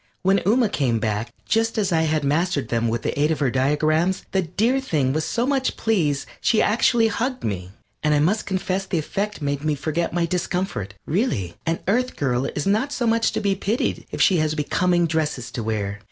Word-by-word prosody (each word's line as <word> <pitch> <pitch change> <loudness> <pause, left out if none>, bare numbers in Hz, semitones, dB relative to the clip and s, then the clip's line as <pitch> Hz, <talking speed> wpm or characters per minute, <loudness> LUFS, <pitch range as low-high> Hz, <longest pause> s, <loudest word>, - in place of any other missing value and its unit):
When 195 +1 +4
Ooma 225 0 +3
came 125 -5 +1
back, 110 +1 -2
just 225 +1 +1
as 205 -3 +1
I 165 -1 +3
had 155 -1 0
mastered 155 +1 0
them 115 0 +1
with 115 0 -2
the - - -1
aid 150 - +3
of 160 - +1
her 135 -4 +1
diagrams, 155 +7 +1
the 190 - +2
dear 220 +10 +1
thing 150 - 0
was 155 +1 -1
so 235 - 0
much 270 -1 0
pleased 165 -11 +1 0.2
she 225 - +3
actually 230 +1 +3
hugged 250 +4 -2
me, 90 -4 -3 0.3
and 150 -1 +2
I - - +3
must 185 +9 +1
confess 190 0 -1
the 180 - -1
effect 195 +3 -3
made 140 0 -1
me 155 -1 +1
forget 155 +4 -2
my 175 -1 +1
discomfort. 170 - -2
Really, 150 - -1
an 165 0 0
Earth 250 +6 +1
girl 130 -1 0
is 150 - -3
not 215 +8 +1
so 250 -4 -1
much 230 0 +2
to - - 0
be 200 -2 +2
pitied 205 +4 -2
if - - -6
she 185 - +4
has 155 -1 +1
becoming 175 +3 +1
dresses 155 -6 -2
to 120 - -4
wear. 105 -2 -2
165 Hz, 210 wpm, -23 LUFS, 140-205 Hz, 0.3 s, When